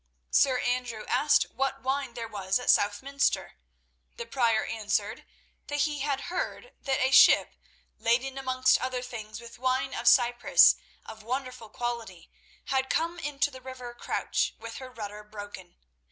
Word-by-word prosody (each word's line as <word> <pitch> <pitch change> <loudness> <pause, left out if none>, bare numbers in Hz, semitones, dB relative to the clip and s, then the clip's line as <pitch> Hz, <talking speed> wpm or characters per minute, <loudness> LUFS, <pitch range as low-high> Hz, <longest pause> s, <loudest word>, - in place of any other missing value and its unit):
Sir 260 -2 +4
Andrew 245 -3 -2
asked 295 0 +3
what 270 0 -2
wine 265 -1 -2
there 230 -1 -5
was 195 -2 -1
at 250 - +3
Southminster. 275 +8 +1 0.6
The 235 - -6
Prior 230 -2 +1
answered 215 -1 -2 0.4
that 290 0 -1
he 295 -1 0
had 280 -1 -1
heard 370 +7 -5
that 270 -1 0
a 260 +1 +2
ship, - - +6 0.5
laden 255 +4 +1
amongst 260 -1 +2
other 255 -1 -2
things 220 -4 -7
with 235 0 -12
wine 260 +1 0
of - - -4
Cyprus 240 -1 +6 0.3
of 220 0 -10
wonderful 250 -1 -5
quality, 230 -6 -5 0.3
had 265 0 0
come 335 +3 -1
into 290 -1 -1
the 260 -1 -11
river 255 -2 -8
Crouch - - -2
with - - -8
her 260 -1 -8
rudder 210 -3 -8
broken. 205 -4 -10
250 Hz, 150 wpm, -28 LUFS, 225-270 Hz, 0.6 s, ship